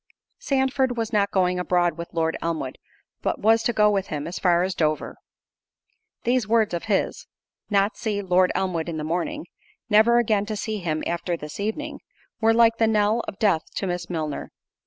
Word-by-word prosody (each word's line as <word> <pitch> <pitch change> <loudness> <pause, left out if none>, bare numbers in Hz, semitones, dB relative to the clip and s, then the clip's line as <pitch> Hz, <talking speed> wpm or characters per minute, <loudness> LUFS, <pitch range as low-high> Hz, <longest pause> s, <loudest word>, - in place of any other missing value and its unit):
Sandford 265 - 0
was 225 0 -2
not 200 -1 +2
going 180 -2 +1
abroad 175 -2 +1
with 170 0 -7
Lord 160 -1 0
Elmwood, 160 -6 -3 0.4
but - - -1
was 225 +2 +4
to 225 - +1
go 210 -2 +4
with 195 -2 0
him 150 -1 -4
as 170 +3 -5
far 175 -1 +3
as 190 +1 -1
Dover. 155 -3 -1 1.1
These 245 -3 +1
words 220 -3 +2
of 170 - -3
his—"Not 200 0 -2
see 215 -3 -2
Lord 185 0 +3
Elmwood 175 -3 -1
in 160 - -4
the 155 - -3
morning"—[never 220 - 0
again 215 -4 +2
to 215 - -3
see 215 0 -3
him 155 -4 -2
after 170 0 -2
this 150 +2 -8
evening,] 215 +2 -3 0.4
were 225 0 +4
like 230 0 +4
the 225 - +4
knell 215 +1 +2
of 195 - -6
death 195 -7 +2
to - - -2
Miss 175 -1 -3
Milner. 155 -4 -3
200 Hz, 180 wpm, -24 LUFS, 170-225 Hz, 1.1 s, was